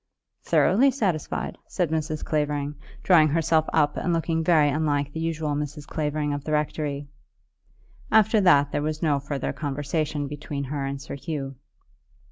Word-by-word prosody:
"Thoroughly 260 +8 +4
satisfied," 195 - -2
said 175 -5 -1
Mrs. 155 -1 -2
Clavering, 150 -1 -1 0.3
drawing 165 -5 +6
herself 160 +1 +2
up 150 -2 +2
and 175 - -1
looking 165 -1 0
very 160 -3 +4
unlike 145 -1 0
the 160 - -4
usual 160 -2 -1
Mrs. 145 0 -4
Clavering 150 -1 -2
of 145 -1 -4
the 155 - -3
rectory. 150 -1 -1 1.0
After 220 0 +5
that 145 -6 +5
there - - -1
was 155 +1 -3
no 145 -3 +2
further 140 0 -3
conversation 145 0 -2
between 145 0 -5
her 140 0 -3
and 135 0 -4
Sir 140 - -8
Hugh. 140 -2 -5
150 Hz, 150 wpm, -25 LUFS, 145-160 Hz, 1.0 s, drawing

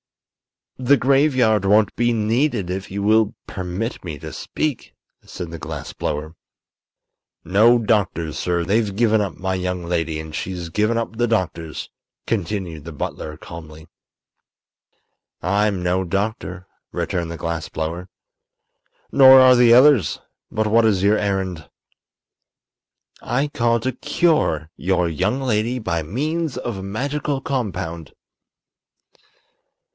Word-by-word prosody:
"The 135 +3 +4
graveyard 130 -6 +3
won't 105 +2 +3
be 120 +1 +2
needed 115 -2 0
if 95 +1 -4
you 100 +1 -4
will 110 0 +3
permit 95 +5 -4
me 85 -5 -5
to 80 +1 -8
speak," 150 -4 -4 0.3
said 85 -3 -8
the 85 - -7
glass 75 -2 -6
blower. 75 +2 -4 1.1
"No 110 +6 +5
doctors, 95 -8 0
sir; 85 -1 0
they've 100 +2 0
given 110 -1 +3
up 100 -4 -3
my 95 0 -2
young 90 -1 -2
lady, 80 -2 -1
and 80 0 -8
she's 90 0 -4
given 105 +6 +1
up 115 -1 -3
the 120 0 +2
doctors," 85 -7 -2 0.3
continued 95 -6 -3
the 85 - -7
butler, 75 0 -5
calmly. 80 -2 -11 1.5
"I'm 100 +1 0
no 90 +1 +1
doctor," 95 -1 -3 0.3
returned 85 -2 -2
the 85 - -6
glass 85 -2 -4
blower. 85 +4 -4 1.0
"Nor 130 -1 +9
are 130 -1 +7
the 120 -1 +5
others. 130 -4 +5 0.3
But 110 - -1
what 115 +2 +4
is 100 -4 +2
your 105 +2 +4
errand?" 95 -7 -2 1.5
"I 135 +4 -1
called 115 -3 +1
to 130 - 0
cure 125 - 0
your 90 -1 +1
young 95 - -1
lady 120 -1 0
by 85 -8 -2
means 150 - -2
of 120 -4 -4
a - - -6
magical 140 +7 -2
compound." 95 - -4
100 Hz, 130 wpm, -21 LUFS, 85-120 Hz, 1.5 s, Nor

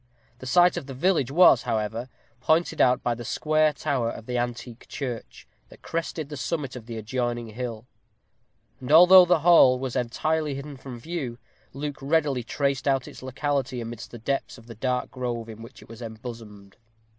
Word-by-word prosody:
The 130 - -8
site 175 +5 +4
of 135 - -5
the 135 - -7
village 150 -3 +1
was, 145 -5 +6
however, 115 +1 -3 0.3
pointed 160 +6 +1
out 125 0 +3
by 120 - +1
the 120 +1 -7
square 155 +5 +1
tower 140 -5 -1
of 110 - -8
the 125 - -4
antique 120 0 -4
church, 125 -5 -6 0.2
that - - -17
crested 165 -3 -4
the 150 - -6
summit 135 +1 -3
of 120 -2 -9
the 115 -1 -6
adjoining 120 +1 -3
hill; 115 0 -6 0.9
and 130 +2 -6
although 180 +3 +9
the 175 -3 +2
hall 160 -6 +6
was 130 -1 -4
entirely 150 +5 -1
hidden 140 +1 -7
from 130 -2 -9
view, 135 -4 -5 0.3
Luke 145 +1 -5
readily 145 -2 +1
traced 140 +3 -2
out 135 -2 +1
its - - -11
locality 130 0 -2
amidst 115 0 -7
the 120 - -9
depths 135 +5 -3
of 115 - -16
the 115 - -10
dark 125 +3 -2
grove 120 -3 -4
in 110 0 -10
which 115 - -12
it - - -18
was 115 +1 -12
embosomed. 110 -3 -9
130 Hz, 180 wpm, -25 LUFS, 120-145 Hz, 0.9 s, although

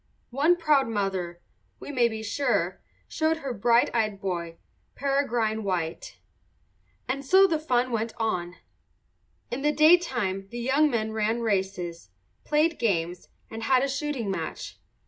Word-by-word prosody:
One 295 +7 +3
proud 300 -6 +3
mother, 190 -5 -2 0.4
we - - -7
may 245 -4 +3
be 220 -1 -5
sure, 205 -6 -1 0.3
showed 320 0 0
her 275 -5 -4
bright 235 +2 +3
eyed 215 -4 0
boy, 170 -3 -4 0.4
Peregrine 240 -6 0
White. 175 -4 -3 0.9
And 275 +2 -2
so 380 +8 +6
the 330 -5 +1
fun 255 -4 0
went 225 0 -2
on. 180 -6 -2 1.0
In 245 +3 -3
the 295 +1 +2
daytime 265 - +3
the 240 - -7
young 275 +5 +3
men 220 -4 -1
ran 220 +2 0
races, 190 - -2 0.3
played 305 +2 +1
games, 175 -6 -1 0.2
and 225 0 -6
had 255 +2 +3
a - - +1
shooting 275 -6 -2
match. 190 - -5
230 Hz, 140 wpm, -26 LUFS, 195-275 Hz, 1.0 s, so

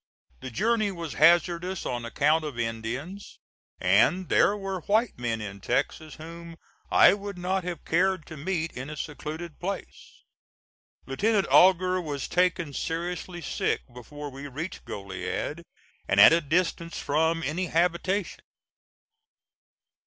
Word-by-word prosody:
The 130 - -7
journey 215 - +1
was 170 -4 -6
hazardous 175 +3 +3
on 120 -1 -3
account 150 +6 +2
of 145 -5 -6
Indians, 120 - -5 0.4
and 185 0 +3
there 205 - +4
were 195 -2 -4
white 220 +3 +2
men 115 -2 -2
in 100 -1 -7
Texas 145 +6 -2
whom 165 +1 -10 0.3
I - - +7
would 200 -1 -6
not 185 +1 -1
have 175 -3 -5
cared 185 -1 +1
to 160 - -9
meet 165 +2 -2
in 130 +3 -6
a 150 - -7
secluded 155 +2 -6
place. 195 +1 -7 0.8
Lieutenant 200 - +1
Augur 185 0 +5
was 145 -4 -4
taken 175 -4 +1
seriously 175 +3 -4
sick - - -1
before 145 +4 -8
we 135 +2 -8
reached 155 +7 -6
Goliad 100 - -4 0.5
and 95 - +2
at 105 - +10
a 170 - +3
distance 170 +2 -1
from 160 +3 0
any 175 +5 -2
habitation. 180 +3 0
165 Hz, 130 wpm, -27 LUFS, 145-185 Hz, 0.8 s, at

